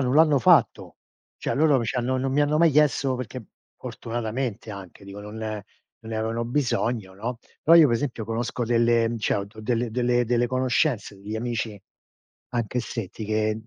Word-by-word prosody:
non 130 Hz, 0 st, +1 dB
l'hanno 155 Hz, -2 st, +5 dB
fatto. 125 Hz, -, +3 dB, 0.4 s
Cioè, -, -, -2 dB
loro 150 Hz, -2 st, +4 dB
mi 115 Hz, -, -1 dB
ci 115 Hz, -, -2 dB
hanno 125 Hz, +1 st, 0 dB
non 130 Hz, +1 st, -1 dB
mi 145 Hz, -, +2 dB
hanno 145 Hz, +1 st, +2 dB
mai 165 Hz, 0 st, +5 dB
chiesto 145 Hz, -2 st, +2 dB
perché 125 Hz, -1 st, -6 dB, 0.3 s
fortunatamente 115 Hz, -1 st, -4 dB
anche, 100 Hz, -1 st, -10 dB
dico, 100 Hz, +1 st, -9 dB
non 105 Hz, +1 st, -9 dB, 0.7 s
non 115 Hz, 0 st, -8 dB
ne -, -, -2 dB
avevano 115 Hz, +1 st, -2 dB
bisogno, 120 Hz, -6 st, -1 dB
no; 115 Hz, +6 st, -4 dB, 0.3 s
però 165 Hz, +2 st, +7 dB
io 160 Hz, -, +8 dB
pe 120 Hz, -, 0 dB
esempio 115 Hz, -2 st, -2 dB
conosco 115 Hz, +2 st, -2 dB
delle 115 Hz, 0 st, +3 dB
mhmm, 115 Hz, -, -3 dB
cioè 105 Hz, -, 0 dB
ho 100 Hz, -, -1 dB
do 105 Hz, +2 st, -13 dB
delle 115 Hz, +1 st, -1 dB
delle 120 Hz, +1 st, +1 dB
delle 120 Hz, +1 st, +1 dB
conoscenze, 130 Hz, -3 st, 0 dB
degli 105 Hz, +3 st, -6 dB
amici 110 Hz, -2 st, -3 dB, 0.7 s
anche 120 Hz, 0 st, -2 dB
se 115 Hz, -3 st, -4 dB
ti 110 Hz, -, -8 dB
che 110 Hz, 0 st, +1 dB
120 Hz, 190 wpm, -25 LUFS, 110-130 Hz, 0.7 s, io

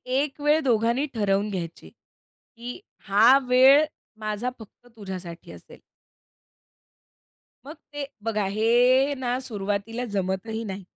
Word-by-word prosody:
एक 280 Hz, +1 st, -1 dB
वेळ 295 Hz, +2 st, +3 dB
दोघांनी 235 Hz, +2 st, +1 dB
ठरवून 205 Hz, -2 st, 0 dB
घ्यायची 170 Hz, -4 st, -6 dB
की 245 Hz, +1 st, -13 dB, 0.3 s
हा 225 Hz, +7 st, +6 dB
वेळ 265 Hz, +4 st, +6 dB, 0.3 s
माझा 215 Hz, +3 st, -3 dB
फक्त 225 Hz, +2 st, -15 dB
तुझ्यासाठी 185 Hz, -4 st, -8 dB
असेल. -, -, -14 dB, 1.9 s
मग 295 Hz, +3 st, -9 dB, 0.2 s
ते 290 Hz, -1 st, -4 dB, 0.2 s
बघा, 215 Hz, -2 st, -1 dB
हे 245 Hz, +7 st, +3 dB
ना 250 Hz, -1 st, -2 dB
सुरुवातीला 210 Hz, 0 st, -4 dB
जमतही 195 Hz, +4 st, -2 dB
नाही. 195 Hz, -2 st, -6 dB
225 Hz, 110 wpm, -25 LUFS, 200-255 Hz, 1.9 s, हा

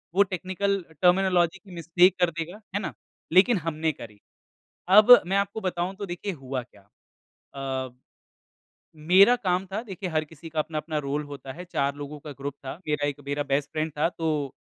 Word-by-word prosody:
वो 200 Hz, -, +6 dB
technical 190 Hz, +2 st, -1 dB, 0.2 s
terminology 180 Hz, -1 st, +3 dB
की 190 Hz, +1 st, -17 dB
mistake 175 Hz, +2 st, +3 dB
कर 175 Hz, -1 st, +3 dB
देगा? 175 Hz, +6 st, -6 dB
है -, -, +2 dB
ना। 190 Hz, -, -4 dB, 0.4 s
लेकिन 205 Hz, +5 st, +6 dB
हमने 160 Hz, -1 st, -1 dB
करी। 105 Hz, -6 st, -12 dB, 0.7 s
अब 215 Hz, +6 st, +9 dB
मैं 190 Hz, +2 st, 0 dB
आपको 200 Hz, +2 st, -1 dB
बताऊँ 185 Hz, -1 st, -2 dB
तो 200 Hz, 0 st, -5 dB
देखिए 180 Hz, +3 st, -4 dB
हुआ 135 Hz, -4 st, -5 dB
क्या। 100 Hz, -4 st, -22 dB, 0.7 s
अ 130 Hz, -1 st, -3 dB, 1.1 s
मेरा 185 Hz, +9 st, +6 dB
काम 185 Hz, -4 st, -1 dB
था 210 Hz, +3 st, -2 dB
देखिए 195 Hz, -4 st, -6 dB
हर 155 Hz, -2 st, 0 dB
किसी 160 Hz, +2 st, -12 dB
का 160 Hz, 0 st, -3 dB
अपना-अपना 155 Hz, 0 st, -3 dB
रोल 145 Hz, +1 st, -2 dB
होता 145 Hz, -2 st, -9 dB
है। 175 Hz, +5 st, -9 dB
4 140 Hz, -5 st, -1 dB
लोगों 145 Hz, +1 st, -7 dB
का 150 Hz, +1 st, -9 dB
ग्रुप 140 Hz, +1 st, -5 dB
था। 135 Hz, -, -4 dB
मेरा 150 Hz, -1 st, 0 dB
एक 145 Hz, 0 st, -4 dB
मेरा 145 Hz, +1 st, -1 dB
बेस्ट 140 Hz, 0 st, -1 dB
फ्रेंड 155 Hz, 0 st, -2 dB
था 155 Hz, +3 st, +2 dB
तो 155 Hz, -5 st, -2 dB
165 Hz, 180 wpm, -26 LUFS, 145-190 Hz, 1.1 s, अब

